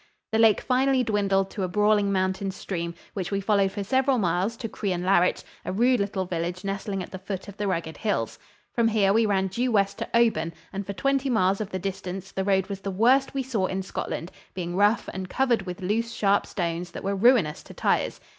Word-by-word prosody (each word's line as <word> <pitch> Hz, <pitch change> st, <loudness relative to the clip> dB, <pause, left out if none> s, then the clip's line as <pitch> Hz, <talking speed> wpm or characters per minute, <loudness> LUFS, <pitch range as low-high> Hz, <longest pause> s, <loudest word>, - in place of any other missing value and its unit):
The 220 Hz, -, +1 dB
lake 225 Hz, -2 st, +5 dB
finally 260 Hz, 0 st, +2 dB
dwindled 200 Hz, -3 st, +1 dB
to 205 Hz, -, -5 dB
a 185 Hz, -, 0 dB
brawling 205 Hz, +2 st, +2 dB
mountain 190 Hz, 0 st, 0 dB
stream, 170 Hz, -3 st, -4 dB, 0.2 s
which 185 Hz, -4 st, -3 dB
we 200 Hz, -, 0 dB
followed 200 Hz, -1 st, +2 dB
for 200 Hz, -, -4 dB
several 265 Hz, +5 st, +2 dB
miles 190 Hz, +3 st, 0 dB
to 225 Hz, -, -4 dB
Crianlarich, 185 Hz, -3 st, +1 dB, 0.2 s
a -, -, -3 dB
rude 240 Hz, +5 st, +3 dB
little 200 Hz, -1 st, -1 dB
village 175 Hz, +1 st, -3 dB
nestling 195 Hz, -1 st, -3 dB
at -, -, -11 dB
the 190 Hz, -, -6 dB
foot 195 Hz, 0 st, -5 dB
of 200 Hz, -, -9 dB
the 205 Hz, -, -1 dB
rugged 165 Hz, -4 st, -2 dB
hills. 215 Hz, -, -2 dB, 0.3 s
From 235 Hz, -1 st, +3 dB
here 205 Hz, -3 st, +3 dB
we 225 Hz, 0 st, +3 dB
ran 190 Hz, -2 st, +2 dB
due 240 Hz, +7 st, -1 dB
west 200 Hz, -1 st, +1 dB
to 230 Hz, -, -4 dB
Oban, 220 Hz, -8 st, +2 dB, 0.2 s
and 195 Hz, 0 st, -4 dB
for 200 Hz, -, -3 dB
twenty 275 Hz, +4 st, 0 dB
miles 195 Hz, -4 st, +2 dB
of 205 Hz, -, -4 dB
the 190 Hz, -, -3 dB
distance 190 Hz, 0 st, -5 dB
the 190 Hz, -, -2 dB
road 190 Hz, -1 st, +2 dB
was 200 Hz, -1 st, -5 dB
the 195 Hz, -, -4 dB
worst 250 Hz, +8 st, +3 dB
we 270 Hz, -, 0 dB
saw 225 Hz, -7 st, 0 dB
in 190 Hz, +1 st, -3 dB
Scotland, 175 Hz, -2 st, -4 dB, 0.2 s
being 175 Hz, -1 st, -3 dB
rough 205 Hz, +4 st, +3 dB
and 190 Hz, -1 st, -5 dB
covered 235 Hz, -6 st, +1 dB
with 180 Hz, +2 st, -6 dB
loose, 225 Hz, +5 st, 0 dB
sharp 200 Hz, -2 st, +2 dB
stones 175 Hz, -1 st, -3 dB
that -, -, -7 dB
were 195 Hz, +1 st, 0 dB
ruinous 200 Hz, -7 st, +4 dB
to -, -, -13 dB
tires. -, -, 0 dB
195 Hz, 215 wpm, -26 LUFS, 185-225 Hz, 0.3 s, lake